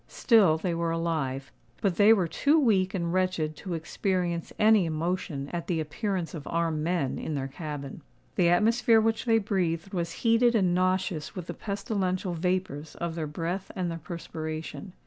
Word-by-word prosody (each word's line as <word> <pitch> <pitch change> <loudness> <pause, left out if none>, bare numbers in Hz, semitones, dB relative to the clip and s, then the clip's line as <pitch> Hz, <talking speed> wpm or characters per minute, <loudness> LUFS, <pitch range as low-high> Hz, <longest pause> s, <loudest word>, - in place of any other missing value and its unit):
Still 205 -10 +4
they 170 +2 -2
were 170 0 -1
alive; 155 -5 -2 0.3
but 190 -4 0
they 205 +2 +7
were 195 -6 +4
too 290 - +2
weak 200 -8 +2
and 170 -2 -1
wretched 185 -4 0
to 185 -3 -4
experience 175 +1 -2
any 215 -4 +5
emotion 160 -3 -2
at 170 -1 -3
the 170 -3 0
appearance 180 +3 -3
of 155 -4 -7
armed 165 -2 0
men 165 -5 -1
in 155 - -3
their 135 -1 -2
cabin. 140 -1 -7 0.3
The 170 - +4
atmosphere 225 +5 +4
which 225 +1 0
they 225 -2 +4
breathed 190 -4 -1
was 170 -2 -2
heated 230 +1 +4
and 185 -5 +3
nauseous 185 -3 0
with 180 -3 -5
the - - -5
pestilential 195 -3 -2
vapours 170 -4 -2
of 170 -1 -3
their 160 -2 -3
breath 170 +5 -4
and 180 -2 -1
their 165 - -5
perspiration. 160 +2 -6
175 Hz, 170 wpm, -28 LUFS, 160-195 Hz, 0.3 s, they